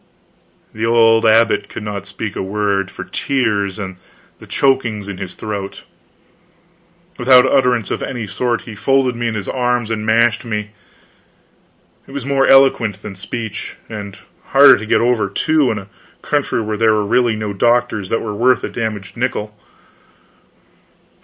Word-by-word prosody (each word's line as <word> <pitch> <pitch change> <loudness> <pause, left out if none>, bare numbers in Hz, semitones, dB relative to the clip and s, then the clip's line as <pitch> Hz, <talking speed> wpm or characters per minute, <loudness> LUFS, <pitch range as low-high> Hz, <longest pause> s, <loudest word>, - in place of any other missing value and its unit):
The 110 - -5
old 115 -1 +4
abbot 115 +1 +3
could 110 - -7
not 100 -2 -5
speak 105 0 -6
a - - -3
word, 100 -1 -1
for - - -8
tears 105 -8 -1
and 95 -3 -6 0.4
the - - -14
chokings 120 -7 0
in 100 -2 -7
his 95 -2 -7
throat; 100 -2 -6 1.4
without 125 0 +6
utterance 125 -5 +1
of - - -2
any 120 -4 -4
sort, 115 +4 -2
he 115 - -9
folded 130 +3 +1
me 120 0 -2
in 115 - -2
his 105 -2 -5
arms 125 -3 -1
and 110 -1 -2
mashed 110 0 +2
me. 105 -2 -4 1.4
It 135 - -13
was 140 -3 -5
more 135 -1 +2
eloquent 120 -7 +4
than 105 - -7
speech. 105 +3 -6
And 100 -3 -7 0.3
harder - - +7
to 110 - -7
get - - +3
over, 120 -4 +1
too, 150 +6 +1
in 110 - -1
a 100 -2 -8 0.4
country 115 - -1
where 105 0 -3
there 110 -1 +3
were 105 -1 0
really 120 +1 +2
no 105 -1 -4
doctors 110 -2 +1
that 115 - -1
were 105 -2 -4
worth 125 +5 +2
a - - -3
damaged 110 -4 -5
nickel. 110 -4 -3
110 Hz, 160 wpm, -17 LUFS, 105-120 Hz, 1.4 s, harder